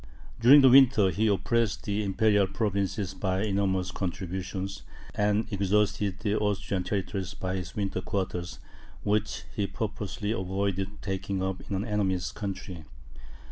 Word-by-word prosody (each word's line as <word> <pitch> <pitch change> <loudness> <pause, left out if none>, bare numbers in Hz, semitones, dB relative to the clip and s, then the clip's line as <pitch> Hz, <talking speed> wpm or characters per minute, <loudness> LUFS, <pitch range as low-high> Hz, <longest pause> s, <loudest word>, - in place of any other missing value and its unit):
During 135 +5 +8
the 135 - +7
winter, 125 -7 +6
he 110 +3 +1
oppressed 110 +2 +1
the 105 0 -1
imperial 100 0 +3
provinces 100 -2 -1
by 95 0 -1
enormous 95 -3 0
contributions, 95 +1 -4 0.3
and 105 +1 +1
exhausted 100 0 +1
the 105 0 0
Austrian 100 -2 -1
territories 95 -1 -3
by 95 0 -3
his 90 -3 -6
winter 100 -3 -2
quarters, 90 -3 -3 0.5
which 105 +1 0
he 100 -2 0
purposely 105 -1 -4
avoided 95 0 -2
taking 95 -1 -2
up 95 0 -2
in 100 - -1
an 95 +3 -2
enemy's 95 -5 0
country. 95 -4 -6
100 Hz, 135 wpm, -28 LUFS, 95-105 Hz, 0.5 s, During